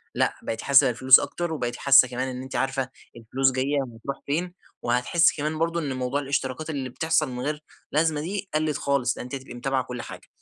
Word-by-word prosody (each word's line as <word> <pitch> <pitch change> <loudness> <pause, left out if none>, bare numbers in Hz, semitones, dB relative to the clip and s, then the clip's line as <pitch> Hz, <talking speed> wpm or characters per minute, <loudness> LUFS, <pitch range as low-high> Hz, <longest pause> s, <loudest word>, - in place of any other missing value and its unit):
لأ - - +1
بقيتِ 115 - -4
حاسة 140 -1 +5
بالفلوس 130 +2 +7
أكتر 175 -2 -3
وبقيتي 120 -5 -3
حاسة 135 -2 +7
كمان 125 +1 -3
إن 130 -1 -5
أنتِ 130 +1 -8
عارفة 135 -1 -1 0.3
الفلوس 130 +4 +1
جاية 135 +3 0
وهتروح 120 +2 -7
فين، 175 +5 -2 0.3
وهتحسي 125 +8 +2
كمان 155 +1 -3
برضه 170 +1 0
إن 145 -5 -3
موضوع 130 +2 -2
الاشتراكات 140 +2 -3
اللي 135 -4 -3
بتحصل 160 +2 0
من 125 -1 -6
غير 150 +1 -3 0.3
لازمة 155 0 +1
دي 195 +3 -4
قلِّت 155 -1 0
خالص 135 -4 0
لأن - - -6
أنتِ 125 +2 -6
هتبقي 130 -1 -9
متابعة 130 +1 -1
كل 125 -1 -6
حاجة، - - -10
135 Hz, 200 wpm, -25 LUFS, 125-155 Hz, 0.3 s, بالفلوس